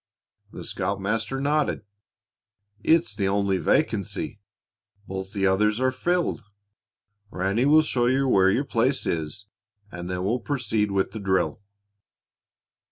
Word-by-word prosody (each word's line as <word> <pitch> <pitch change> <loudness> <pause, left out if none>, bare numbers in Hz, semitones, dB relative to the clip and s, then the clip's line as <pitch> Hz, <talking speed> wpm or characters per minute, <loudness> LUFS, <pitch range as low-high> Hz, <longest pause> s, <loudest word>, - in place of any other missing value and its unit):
The - - -8
scoutmaster 105 +7 -2
nodded. 145 -3 0 1.0
"It's 155 -10 +3
the 100 -2 -1
only 100 -1 +1
vacancy. 85 +4 0 0.7
Both 95 0 -5
the 100 -2 -1
others 105 +3 +2
are 130 0 +2
filled. 175 +7 -1 0.9
Ranny 100 +5 0
will 155 +2 +6
show 120 -5 +1
you 135 +2 +2
where 95 -6 +4
your 130 +9 +1
place 130 +1 +1
is, 80 +4 -2 0.5
and 85 0 -6
then 90 0 -2
we'll 115 +6 0
proceed 115 -5 -1
with 95 -1 0
the 110 - -6
drill." 95 0 0
105 Hz, 125 wpm, -25 LUFS, 95-130 Hz, 1.0 s, will